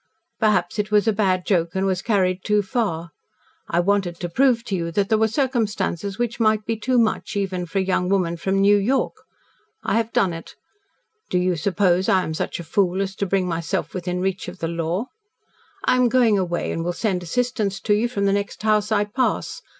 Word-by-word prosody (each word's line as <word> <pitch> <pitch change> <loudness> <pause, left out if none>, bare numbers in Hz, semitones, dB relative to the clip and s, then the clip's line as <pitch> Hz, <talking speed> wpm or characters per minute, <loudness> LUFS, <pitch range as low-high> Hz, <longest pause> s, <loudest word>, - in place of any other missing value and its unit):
Perhaps 210 -3 +1
it 210 0 0
was 210 +1 +3
a 220 - +4
bad 190 -3 +1
joke 170 -3 +1
and 190 +1 +1
was 190 -1 0
carried 185 -4 +1
too 210 -1 +2
far. 175 -6 -2 0.6
I 170 - +1
wanted 185 -2 0
to 175 - -3
prove 245 +4 +3
to 200 - -3
you 170 -2 -2
that 200 +1 +1
there 220 - +4
were 220 - +4
circumstances 215 - -1
which 240 0 -2
might 215 -1 +2
be 225 - -1
too 250 +4 0
much 225 -1 +1
even 185 -3 -2
for 165 - -4
a 190 - +2
young 185 -1 0
woman 180 -4 +1
from 190 +3 0
New 200 +1 +5
York. 240 +7 +1 0.7
I - - +1
have 230 0 -1
done 185 -3 +2
it. 165 - -9 0.7
Do 180 - +1
you 180 0 +1
suppose 185 +1 +1
I 185 -1 +4
am 160 - -4
such 160 - -3
a - - -5
fool 185 +2 +1
as 195 -1 -2
to 200 - -1
bring 185 0 +1
myself 165 -2 -2
within 180 -1 -3
reach 190 0 -2
of 180 +1 -7
the 165 - -3
law? 170 +5 -2 0.8
I 255 - +3
am 250 -1 +4
going 235 -3 +4
away 175 -3 -1
and 165 - -2
will 175 +1 -1
send 190 -2 -1
assistance 210 0 -1
to 210 - +2
you 220 +3 +1
from 200 -4 -1
the 195 - +3
next 200 +1 -3
house 215 0 +2
I 210 -1 +3
pass. 250 +5 -1
195 Hz, 215 wpm, -22 LUFS, 180-215 Hz, 0.8 s, New